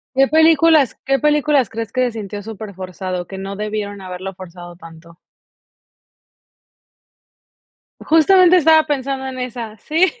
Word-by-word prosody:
¿Qué 270 +1 +4
películas 315 -2 +4
qué 270 0 +1
películas 295 -5 +2
crees 225 -2 -6
que 255 - -1
se 245 - -2
sintió 205 -2 -7
superforzado, 185 -4 -7
que 190 - -9
no 195 +1 -6
debieron 210 -1 -5
haberlo 185 +1 -7
forzado 175 -1 -12
tanto? 165 0 -15 2.8
Justamente, 360 +3 +4
estaba 315 -1 +4
pensando 270 -2 -3
en 260 -1 -7
esa. 240 -3 -6
Sí. 325 +4 +2
225 Hz, 125 wpm, -18 LUFS, 190-300 Hz, 2.8 s, Qué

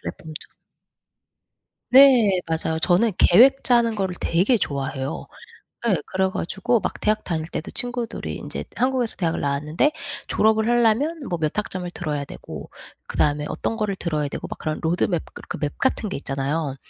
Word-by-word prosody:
플랫폼도 160 -1 -8 1.6
네 250 -8 +7
맞아요. 160 0 -1
저는 190 +6 +3
계획 255 +9 +6
짜는 235 -2 +3
거를 190 -3 -2
되게 190 +8 +2
좋아해요. 135 -4 -3 0.6
예 200 - +4
그래 190 0 0
가지고 210 +6 0
막 - - -3
대학 215 0 +1
다닐 160 -3 -2
때도 155 - -5
친구들이 245 -1 -3
인제 - - -6
한국에서 250 -2 0
대학을 165 -3 -1
나왔는데 150 - +1 0.4
졸업을 220 +1 +2
하려면 240 +7 +2
뭐 175 - -1
몇 155 +2 -1
학점을 185 -4 -3
들어야 150 -5 -3
되고 - - -9 0.4
그다음에 150 0 +1
어떤 225 - -3
거를 210 -3 -1
들어야 155 -5 -2
되고 - - -6
막 - - -6
그런 155 0 -3
로드맵 170 +1 0
그렇게 - - -7
맵 145 -1 -2
같은 250 -5 0
게 - - -3
있잖아요. 140 +1 -2
185 Hz, 350 characters per minute, -23 LUFS, 155-230 Hz, 1.6 s, 네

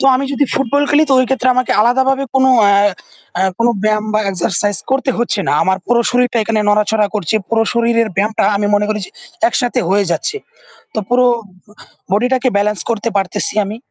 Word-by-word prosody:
তো - - -2
আমি 265 +2 0
যদি 285 +1 +1
ফুটবল 275 +2 0
খেলি 295 +2 +4
তো - - +2
ওই 255 - +3
ক্ষেত্রে 260 -1 0
আমাকে 255 0 0
আলাদাভাবে 265 +4 +2
কোন 265 0 +3 0.2
আ - - +4 0.9
কোন 230 - +2 0.2
ব্যায়াম 215 0 +1
বা 215 - +2
এক্সারসাইজ 195 +2 0
করতে 270 0 0
হচ্ছে 235 -3 0
না। - - +1
আমার 190 0 0
পুরো 240 0 +2
শরীরটা 245 -1 +1
এখানে 215 0 -1
নড়াচড়া 210 +1 +2
করছে। 205 -2 -2
পুরো 225 -1 +1
শরীরের 230 -1 +1
ব্যায়ামটা 210 +3 0
আমি 205 +1 -1
মনে 205 0 +2
করি 215 0 -1
যে - - -15 0.4
একসাথে 245 -8 -1
হয়ে 200 +2 +2
যাচ্ছে। 295 - -1 0.6
তো - - -2
পুরো 250 +1 +3 0.9
বডিটাকে 250 +5 +1
ব্যালেন্স 210 0 0
করতে 230 0 -1
পারতেছি 195 +2 -1
আমি। 210 +3 -6
230 Hz, 180 wpm, -15 LUFS, 210-255 Hz, 0.9 s, খেলি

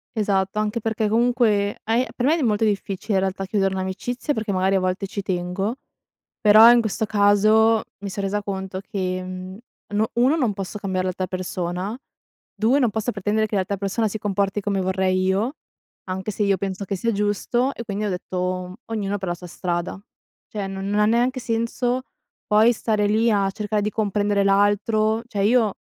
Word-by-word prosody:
Esatto, 200 -1 0
anche 215 +2 -1
perché 220 -1 -1
comunque 225 -3 +2
ai 230 +3 +2
per 245 - 0
me 310 - +4
è - - -1
d - - -2
molto 215 -1 +1
difficile 205 0 -1
in - - +4
realtà 190 0 -2
chiudere 195 -1 0
un'amicizia 190 +9 -3
perché 220 -1 -2
magari 190 0 +2
a - - +3
volte 185 +1 -1
ci 200 0 -5
tengo 190 +4 -2 0.6
però 215 +2 +8
in 240 0 +6
questo 220 0 -1
caso 215 +2 +4 0.2
mi 200 - -5
son 200 +1 -4
resa 205 +1 -1
conto 190 -1 -4
che, 185 -2 -3
mhmm, 185 +1 -7 0.4
no 215 +1 +1
1 250 +6 +4
non 250 -10 +1
posso 195 +1 -6
cambiare 185 -2 -2
l'alta 185 0 -2
persona, 185 +3 -3 0.6
2 240 +6 +2
non 245 -4 +3
posso 220 +3 -2
pretendere 210 +2 0
che 210 - -3
l'altra 195 +1 0
persona 200 +3 0
si 220 - -4
comporti 200 -1 -1
come 195 -1 -1
vorrei 185 0 +1
io 205 +9 0 0.5
anche 190 +3 -3
se 210 - -1
io 200 -1 +2
penso 195 +1 -4
che 195 0 -3
sia 230 +4 0
giusto 210 +6 0
e 235 - -7
quindi 205 0 -3
ho 205 - 0
detto 180 0 -3
m 180 - -9
ognuno 205 -3 -2
per 190 -2 -4
la - - 0
sua 180 0 -11
strada. 175 +1 -3 0.5
Cioè 205 -2 -4
non 195 0 -5
non 205 +1 +1
ha 210 - +5
neanche 240 +4 +2
senso 240 +2 -1 0.4
poi 220 +3 +5
stare 215 -2 0
lì 220 +3 +3
a 200 -2 +2
cercare 210 +1 -2
di 210 +1 -1
comprendere 205 -1 +1
l'altro, 205 +3 +2
cioè 205 -4 -2
io 225 -2 +3
205 Hz, 195 wpm, -23 LUFS, 190-220 Hz, 0.6 s, però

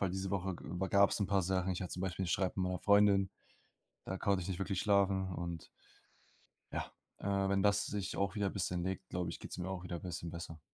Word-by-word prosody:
weil 95 -2 +1
diese 95 0 -2
Woche 95 -1 0
über 95 +2 -3
gab's 100 +2 +4
'n 100 - +2
paar 100 0 +2
Sachen. 95 +1 +1
Ich 90 - -3
hatte 90 - -4
zum 90 - -4
Beispiel 95 0 -1
'n - - -3
Streit 95 +1 +1
mit 95 - +1
meiner 90 0 -1
Freundin, 100 -1 +5 0.8
da 95 - -3
konnte 100 0 +2
ich 85 - -5
nicht 95 -3 -3
wirklich 95 -1 -1
schlafen. 100 -2 +3
Und 85 -2 -4 1.1
ja. - - -3 0.3
Äh, 100 -1 +1
wenn 100 -1 +2
das 105 0 +4
sich 100 -2 -3
auch 100 +2 0
wieder 100 -2 +1
bisschen 90 -2 -1
legt, 95 0 -3
glaube 90 -1 -2
ich, - - -6
geht's - - -7
mir 90 0 -3
auch 95 -2 -4
wieder 85 -2 -4
bisschen 85 -1 -5
besser. 85 -1 -7
95 Hz, 230 wpm, -35 LUFS, 90-100 Hz, 1.1 s, Freundin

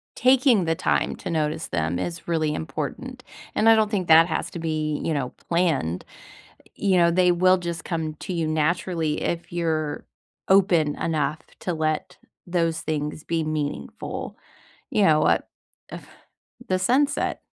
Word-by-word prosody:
taking 255 -5 +4
the 165 -1 0
time - - 0
to - - -6
notice 155 -1 -1
them 85 +1 -1
is 170 - -5
really 155 -3 0
important. 80 - -5 0.3
And 215 - +2
I 225 - +8
don't 215 -1 +2
think 190 -5 -1
that 165 +1 +7
has 165 - -2
to 170 - -6
be, 155 -2 -2
you 165 - 0
know, 135 -4 -2 0.2
planned. 160 - 0 0.7
You 195 -2 +1
know, 170 -1 +5
they 180 +1 +4
will 185 +2 +4
just 170 -2 -5
come 160 -3 -3
to 185 - -6
you 165 -2 -1
naturally 160 0 0
if 170 0 -3
you're 160 -3 -1 0.5
open 175 -6 +3
enough 155 -2 -1 0.2
to 180 - -2
let 155 -1 -2 0.3
those 165 -2 0
things 150 0 -3
be 165 -1 -1
meaningful, 155 -2 -4 0.6
you 210 - +3
know, 155 -3 +4
uh, - - +4 0.5
uh, - - -6 0.7
the 185 - +1
sunset 270 +9 +1
165 Hz, 155 wpm, -24 LUFS, 155-180 Hz, 0.7 s, I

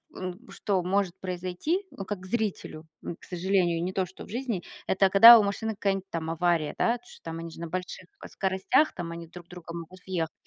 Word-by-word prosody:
м, 185 +6 -7
что 195 -3 -1
может 190 0 0
произойти, 185 - -2
ну, 195 - -7
как 190 -2 -5
зрителю, 195 -6 -3 0.2
м, 170 - -5
к - - -16
сожалению, 180 -2 +1
не 180 - -2
то, 190 0 0
что 185 - -12
в - - -14
жизни, 235 -5 -3 0.2
это 190 0 +3
когда 230 +5 +11
у 215 - +4
машины 205 +2 -2
какая-нибудь 195 -2 -1
там 160 -2 -3
авария, 165 -2 +1
да. 235 +1 +2
Чё-то 245 - -17
там 165 0 -5
они 165 0 -6
же - - -12
на 170 - -4
больших, 180 +1 -5 0.2
э, - - -7
скоростях, 195 +10 +1
там, 170 -2 -5
они 170 0 -7
в - - -27
друг 175 -1 -11
друга 175 -2 -9
могут 170 +2 -8
въехать. 170 -4 -1
185 Hz, 220 wpm, -28 LUFS, 170-200 Hz, 0.2 s, когда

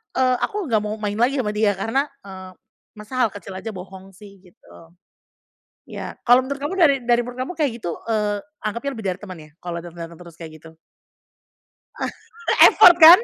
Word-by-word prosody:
eee, 255 -1 +3
aku 415 -1 -2
nggak 220 -2 +3
mau 210 +1 -3
main 205 -1 -3
lagi 255 +4 +2
sama 210 -4 -1
dia 210 -1 +2
karena, 225 +9 -1 0.2
eee, 190 -1 -10 0.4
masa 210 +4 -12
hal 240 - +4
kecil 200 -1 -9
aja 225 - -6
bohong 190 +1 -11
sih, 200 0 -15
gitu. 180 -2 -23 1.2
Ya, - - -7
kalau 245 +1 +6
menurut 280 0 -5
kamu 310 +6 -2
dari 285 -5 +5
dari 240 0 +3
menurut 245 +1 -9
kamu 360 - -6
kayak 285 -4 +2
gitu, 170 -1 -4
eee, 210 -2 0 0.2
anggapnya 235 +6 -3
lebih 220 - -8
dari - - -15
teman 185 -3 -8
ya, 155 0 -15
kalau 175 -1 -5
dateng-dateng 170 -1 -9
terus 170 -2 -13
kayak 160 -2 -8
gitu? 160 - -13 2.0
Effort 350 - +8
kan? 335 +3 +11
210 Hz, 180 wpm, -21 LUFS, 185-255 Hz, 2.0 s, kan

